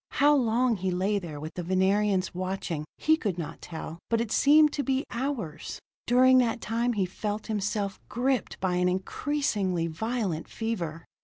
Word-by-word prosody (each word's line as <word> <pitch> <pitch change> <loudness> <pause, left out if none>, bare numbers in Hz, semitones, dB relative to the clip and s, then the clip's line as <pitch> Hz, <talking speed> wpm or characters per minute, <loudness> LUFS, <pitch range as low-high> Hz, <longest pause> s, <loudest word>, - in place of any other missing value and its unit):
How 290 +1 +5
long 240 -2 +2
he 190 0 -1
lay 190 +3 +1
there 160 -6 -7
with 155 +2 -6
the 180 - -4
Venerians 190 +2 +1
watching, 185 -4 -3
he 315 - +4
could 200 - -2
not 165 -4 -6
tell, 165 0 -7
but 230 - +2
it 230 -2 -2
seemed 300 +1 +5
to 290 - 0
be 270 +1 0
hours. 235 - -3 0.3
During 255 +1 +6
that 235 -1 +1
time 235 +2 0
he 200 -4 +1
felt 205 +3 -4
himself 205 -2 -2
gripped 255 -2 -1
by 180 -1 0
an 180 0 +3
increasingly 190 - -1
violent 180 0 -2
fever. 170 -8 -4
205 Hz, 165 wpm, -28 LUFS, 180-245 Hz, 0.3 s, During